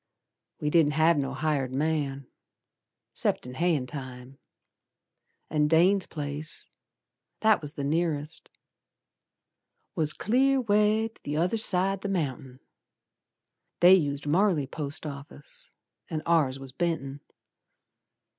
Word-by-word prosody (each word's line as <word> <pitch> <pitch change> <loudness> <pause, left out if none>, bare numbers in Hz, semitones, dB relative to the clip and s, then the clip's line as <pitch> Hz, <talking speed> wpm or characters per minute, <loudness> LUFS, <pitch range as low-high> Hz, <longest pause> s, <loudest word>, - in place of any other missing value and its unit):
We 150 - -1
didn't 155 -3 +4
have 160 +2 +4
no 135 0 -2
hired 140 -4 -1
man, 140 -1 -1 0.9
'Cept - - 0
in 125 - -8
hayin' 160 -2 +1
time; 130 0 -9 1.1
An' 150 -1 +1
Dane's 180 +5 +4
place, 150 +1 -5 0.8
That 220 -3 +4
was 150 0 -4
the 140 - -4
nearest, 155 0 -2 1.4
Was 155 -1 0
clear 265 +5 +2
way 215 -1 +2
'tother 170 0 -2
side 195 -2 +1
the 200 - -3
mountain. 135 -7 -3 1.2
They 180 +2 +8
used 145 -5 +1
Marley 170 -1 +2
post 145 +2 -6
office 145 0 -10 0.4
An' 155 -1 -3
ours 155 -6 +2
was 135 -1 -9
Benton. 140 -2 -3
155 Hz, 110 wpm, -27 LUFS, 140-175 Hz, 1.4 s, They